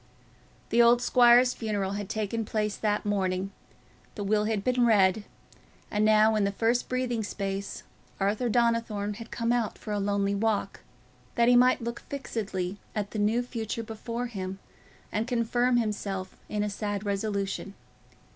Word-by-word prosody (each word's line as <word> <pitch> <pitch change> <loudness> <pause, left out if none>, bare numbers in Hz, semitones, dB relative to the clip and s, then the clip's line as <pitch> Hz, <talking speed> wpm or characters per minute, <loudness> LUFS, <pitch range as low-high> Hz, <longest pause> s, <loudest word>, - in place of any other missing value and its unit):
The 235 - +4
old 235 +1 +6
squire's 245 0 +5
funeral 205 -4 -2
had 200 -1 -4
taken 220 +1 -2
place 210 -1 -1
that 210 -1 -1
morning, 190 -1 -1 0.6
the 205 - -4
will 210 +1 +1
had 215 -2 -1
been 250 +1 +2
read, 205 -1 +4 0.7
and 210 0 +1
now 215 0 +5
in 210 - +2
the 200 - +1
first 230 +4 0
breathing 255 -2 -1
space, 195 -1 -4 0.4
Arthur 210 +5 0
Donnithorne 230 -3 0
had 230 - -9
come 230 0 -1
out 240 -3 0
for 215 - -7
a 205 - 0
lonely 200 0 0
walk, 205 -1 -1 0.6
that 235 0 +3
he 245 - +6
might 250 0 +4
look 235 0 -4
fixedly 205 -8 -4 0.2
at 205 -2 -2
the 215 - -3
new 220 +4 +2
future 230 -2 -4
before 230 +2 -5
him 190 -5 -5 0.5
and 215 +3 -1
confirm 245 +1 +1
himself 200 -4 -2
in 210 -1 -1
a 210 - -1
sad 205 0 -3
resolution. 200 -1 -2
215 Hz, 155 wpm, -28 LUFS, 200-235 Hz, 0.7 s, old